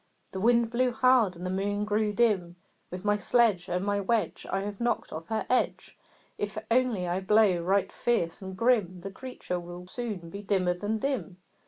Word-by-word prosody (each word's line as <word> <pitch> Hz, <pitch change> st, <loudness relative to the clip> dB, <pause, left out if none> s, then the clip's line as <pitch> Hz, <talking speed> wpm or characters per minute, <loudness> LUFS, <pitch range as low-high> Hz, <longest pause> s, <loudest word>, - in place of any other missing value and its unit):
The 190 Hz, -, -5 dB
Wind 235 Hz, +2 st, +3 dB
blew 250 Hz, +1 st, +2 dB
hard, 255 Hz, -6 st, +4 dB
and 175 Hz, +2 st, -7 dB
the 185 Hz, -, -2 dB
Moon 205 Hz, +2 st, -1 dB
grew 210 Hz, 0 st, +1 dB
dim. 200 Hz, -6 st, +1 dB, 0.3 s
"With 180 Hz, +3 st, -7 dB
my 205 Hz, 0 st, +3 dB
sledge 210 Hz, -5 st, +2 dB
And 180 Hz, +2 st, -1 dB
my 205 Hz, 0 st, +1 dB
wedge 215 Hz, +3 st, -1 dB
I 195 Hz, -, 0 dB
have 205 Hz, +2 st, -6 dB
knocked 240 Hz, -1 st, -1 dB
off 160 Hz, +2 st, -7 dB
her 220 Hz, -1 st, -2 dB
edge! 250 Hz, -, 0 dB, 0.4 s
If 205 Hz, +1 st, -3 dB
only 235 Hz, -7 st, +2 dB
I 175 Hz, +2 st, 0 dB
blow 195 Hz, -2 st, +3 dB
right 190 Hz, +3 st, +1 dB
fierce 190 Hz, -9 st, -1 dB
and 190 Hz, -1 st, -7 dB
grim, 210 Hz, -7 st, +2 dB
The 195 Hz, +2 st, -6 dB
creature 210 Hz, -6 st, -5 dB
will 175 Hz, +1 st, -9 dB
soon 190 Hz, -5 st, -5 dB
be 200 Hz, -, -6 dB
dimmer 190 Hz, -3 st, +1 dB
than 205 Hz, +5 st, -2 dB
dim." 255 Hz, -7 st, -3 dB
205 Hz, 190 wpm, -28 LUFS, 180-230 Hz, 0.4 s, hard